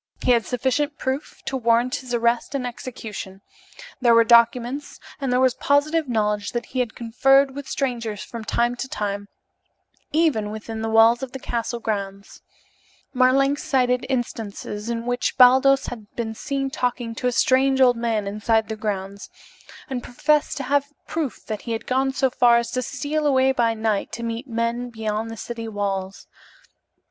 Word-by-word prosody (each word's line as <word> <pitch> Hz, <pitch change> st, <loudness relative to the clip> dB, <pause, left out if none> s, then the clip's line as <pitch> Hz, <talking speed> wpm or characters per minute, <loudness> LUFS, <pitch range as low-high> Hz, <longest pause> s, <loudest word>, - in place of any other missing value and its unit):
He -, -, +3 dB
had 235 Hz, -2 st, +2 dB
sufficient 265 Hz, +4 st, -1 dB
proof 265 Hz, +3 st, -4 dB
to 270 Hz, -, -3 dB
warrant 235 Hz, 0 st, +2 dB
his 255 Hz, -3 st, -9 dB
arrest 235 Hz, +2 st, +1 dB
and 260 Hz, -2 st, -2 dB
execution; 220 Hz, -6 st, -7 dB, 0.6 s
there 235 Hz, -2 st, +5 dB
were 230 Hz, -, +7 dB
documents, 240 Hz, +4 st, +3 dB, 0.2 s
and 270 Hz, -3 st, -2 dB
there 250 Hz, -, +3 dB
was 260 Hz, -1 st, +4 dB
positive 290 Hz, +3 st, +1 dB
knowledge 210 Hz, -3 st, 0 dB
that 240 Hz, 0 st, -2 dB
he 260 Hz, -, -4 dB
had 240 Hz, -3 st, -1 dB
conferred 270 Hz, +4 st, +3 dB
with 280 Hz, 0 st, -7 dB
strangers 235 Hz, -6 st, -2 dB
from 230 Hz, -2 st, -8 dB
time 235 Hz, +2 st, 0 dB
to 265 Hz, -, -4 dB
time, 205 Hz, -4 st, -3 dB, 0.8 s
even 300 Hz, -10 st, +2 dB
within 220 Hz, +1 st, -6 dB
the 225 Hz, -, -2 dB
walls 225 Hz, +2 st, +5 dB
of 265 Hz, -2 st, -6 dB
the 265 Hz, -, -5 dB
castle 235 Hz, -1 st, -3 dB
grounds. 200 Hz, -3 st, -5 dB, 0.7 s
Marlanx 275 Hz, +2 st, +3 dB
cited 250 Hz, -4 st, +1 dB
instances 225 Hz, -3 st, -4 dB
in 230 Hz, 0 st, -3 dB
which 245 Hz, 0 st, -1 dB
Baldos 265 Hz, +2 st, +6 dB
had 220 Hz, -4 st, -7 dB
been 225 Hz, -2 st, -3 dB
seen 275 Hz, +4 st, -3 dB
talking 245 Hz, -2 st, -2 dB
to 250 Hz, +2 st, -2 dB
a -, -, +2 dB
strange 265 Hz, +2 st, +3 dB
old 250 Hz, -2 st, +6 dB
man 230 Hz, -3 st, -1 dB
inside 215 Hz, +2 st, 0 dB
the 220 Hz, -, -3 dB
grounds, 200 Hz, -2 st, -4 dB, 0.6 s
and 260 Hz, -4 st, -3 dB
professed 300 Hz, +6 st, 0 dB
to 275 Hz, -, -3 dB
have 285 Hz, +2 st, +1 dB, 0.2 s
proof 315 Hz, -6 st, -4 dB
that 215 Hz, -2 st, -4 dB
he 230 Hz, -, -4 dB
had 225 Hz, -, -4 dB
gone 265 Hz, +1 st, +1 dB
so 265 Hz, -1 st, +1 dB
far 240 Hz, -1 st, +5 dB
as 235 Hz, 0 st, -2 dB
to 255 Hz, -, -1 dB
steal 295 Hz, +4 st, -2 dB
away 265 Hz, -1 st, +4 dB
by 235 Hz, -3 st, +1 dB
night 220 Hz, -2 st, -1 dB
to 235 Hz, -, -5 dB
meet 230 Hz, +3 st, -4 dB
men 235 Hz, +1 st, -2 dB
beyond 220 Hz, -1 st, -3 dB
the 225 Hz, -, -7 dB
city 230 Hz, +1 st, -6 dB
walls. 195 Hz, -2 st, -3 dB
240 Hz, 175 wpm, -23 LUFS, 225-265 Hz, 0.8 s, were